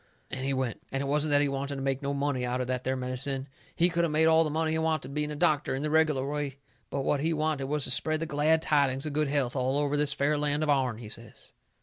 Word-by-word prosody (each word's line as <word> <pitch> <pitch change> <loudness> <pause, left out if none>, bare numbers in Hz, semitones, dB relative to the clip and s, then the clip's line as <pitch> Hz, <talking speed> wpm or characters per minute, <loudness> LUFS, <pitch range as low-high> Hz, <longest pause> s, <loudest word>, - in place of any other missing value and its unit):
And 130 0 -4
he 135 - 0
went. 130 -4 -2
It 135 +1 -2
wasn't 150 +2 +1
that 145 0 +4
he - - +2
wanted 140 +1 -3
to 135 - -5
make 135 0 -1
no 140 0 -2
money 140 -2 -1
out 125 +1 -1
of 125 - -1
that 125 0 -2
there 130 +1 0
medicine. 130 +1 -2 0.3
He 170 - +4
could 170 -1 0
of 170 - +1
made 155 +1 +3
all 160 0 +5
the 155 - -2
money 160 +1 0
he 160 - +1
wanted 155 -4 -1
being 150 0 -1
a 150 - -4
doctor 150 -4 +1
in 135 - -3
the 150 - 0
reg'lar 155 -4 +3
way. 145 -2 -3 0.3
But 140 - -2
what 145 - +1
he 160 +3 +1
wanted 155 -3 -1
was 145 +1 -1
to 125 - -1
spread 155 +4 +1
the 165 - -1
glad 155 +1 +2
tidings 140 -2 +2
of 150 - -3
good 150 0 +1
health 140 -3 0
all 130 +1 0
over 145 0 0
this 145 -1 +2
fair 145 +2 +1
land 150 +1 0
of 150 - +2
ourn, 130 -5 +1
he 115 -2 -9
says. 110 +1 -9
145 Hz, 280 wpm, -28 LUFS, 135-155 Hz, 0.3 s, all